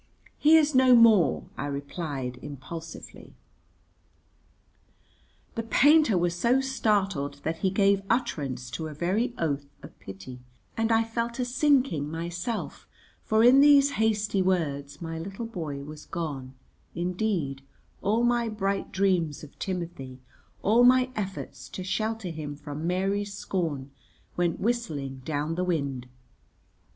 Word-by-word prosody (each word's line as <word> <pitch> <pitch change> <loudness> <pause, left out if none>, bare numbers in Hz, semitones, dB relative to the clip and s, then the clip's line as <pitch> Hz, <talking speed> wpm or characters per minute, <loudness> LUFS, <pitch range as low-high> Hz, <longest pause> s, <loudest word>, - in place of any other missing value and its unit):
"He 310 +2 +7
is 305 -1 +3
no 260 -1 +6
more," 225 -7 +5 0.2
I 145 - -2
replied 140 -3 -4
impulsively. 150 +4 -9 2.2
The 230 - -2
painter 280 - +4
was 175 0 +1
so 235 +9 +2
startled 200 - 0
that 165 +1 -2
he 190 - +1
gave 195 0 +3
utterance 140 - -1
to 160 +3 -4
a 155 - -8
very 210 - 0
oath 145 -3 -1 0.2
of - - -13
pity, 95 +7 -9 0.4
and 225 0 0
I 225 0 +4
felt 230 +1 -3
a 250 - -1
sinking 250 - +2
myself, 175 +7 -4 0.3
for 220 +1 +2
in 255 +3 +7
these 285 -1 +6
hasty 210 -3 +1
words 145 -5 -1
my 165 0 -4
little 195 +7 -6
boy 160 -10 -5
was 150 +1 -10
gone, 140 -6 -5 0.4
indeed; 175 -5 -1 0.4
all 220 +4 +1
my 240 -1 +2
bright 200 -2 -2
dreams 180 -7 +1
of 145 - -13
Timothy, 170 -9 -5 0.4
all 225 +4 +5
my 255 +1 +5
efforts 195 -2 -5
to 185 - -6
shelter 215 +1 -2
him 155 -3 -6
from 145 +2 -6
Mary's 195 +3 -1
scorn, 150 -10 -3 0.4
went 175 -1 0
whistling 155 - -2
down 150 +1 -2
the 180 +2 -1
wind. 140 -8 -2
180 Hz, 130 wpm, -27 LUFS, 145-225 Hz, 2.2 s, He